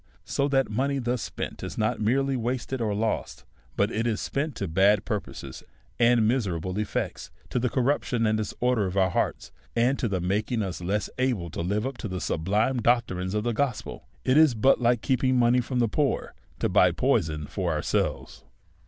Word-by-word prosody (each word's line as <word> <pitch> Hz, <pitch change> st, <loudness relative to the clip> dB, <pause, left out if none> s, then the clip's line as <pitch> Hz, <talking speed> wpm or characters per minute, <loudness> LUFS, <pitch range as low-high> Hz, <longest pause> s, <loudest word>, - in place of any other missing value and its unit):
So 140 Hz, -, 0 dB
that 135 Hz, -2 st, +2 dB
money 135 Hz, +6 st, 0 dB
thus 125 Hz, -2 st, -1 dB
spent -, -, -5 dB
is -, -, -6 dB
not 110 Hz, +2 st, 0 dB
merely 135 Hz, +5 st, +1 dB
wasted 125 Hz, +1 st, -2 dB
or 105 Hz, -3 st, 0 dB
lost, 110 Hz, +2 st, -2 dB, 0.3 s
but 100 Hz, +2 st, +1 dB
it 115 Hz, +2 st, -1 dB
is 110 Hz, -2 st, 0 dB
spent 145 Hz, -1 st, -2 dB
to 100 Hz, -, -3 dB
bad 95 Hz, +5 st, +3 dB
purposes 105 Hz, -4 st, -5 dB, 0.4 s
and 115 Hz, -2 st, +4 dB
miserable 95 Hz, -6 st, -1 dB
ef 105 Hz, -, -3 dB
fects, -, -, -3 dB, 0.2 s
to -, -, +1 dB
the 125 Hz, +1 st, 0 dB
corruption 125 Hz, -2 st, +1 dB
and 110 Hz, 0 st, +2 dB
disordea' 110 Hz, 0 st, 0 dB
of 95 Hz, +2 st, -4 dB
our 95 Hz, -2 st, +3 dB
hearts, -, -, -1 dB, 0.2 s
and 125 Hz, +4 st, +2 dB
to 120 Hz, -, 0 dB
the 95 Hz, -3 st, -1 dB
making 105 Hz, +5 st, 0 dB
us 90 Hz, -2 st, -5 dB
less 100 Hz, +3 st, -1 dB
able 115 Hz, -11 st, 0 dB
to -, -, -4 dB
live 100 Hz, +6 st, -1 dB
up 135 Hz, -2 st, -5 dB
to -, -, -4 dB
the 95 Hz, -2 st, -4 dB
sub 80 Hz, -1 st, -3 dB
lime 115 Hz, +6 st, +2 dB
doctrines 105 Hz, -5 st, +1 dB
of 105 Hz, -, 0 dB
the 120 Hz, 0 st, 0 dB
gospel; 125 Hz, 0 st, -3 dB, 0.2 s
it 130 Hz, +3 st, +4 dB
is 155 Hz, -6 st, +6 dB
but 130 Hz, +4 st, +3 dB
like 120 Hz, -1 st, +3 dB
keeping 130 Hz, 0 st, +2 dB
money 120 Hz, +1 st, +4 dB
from 125 Hz, +1 st, -4 dB
the 120 Hz, -1 st, +3 dB
poor 140 Hz, +5 st, -1 dB, 0.2 s
to -, -, 0 dB
buy -, -, +4 dB
poison 75 Hz, -1 st, 0 dB
for 90 Hz, +3 st, -2 dB
ourselves. 75 Hz, -2 st, -2 dB
115 Hz, 195 wpm, -26 LUFS, 100-125 Hz, 0.4 s, is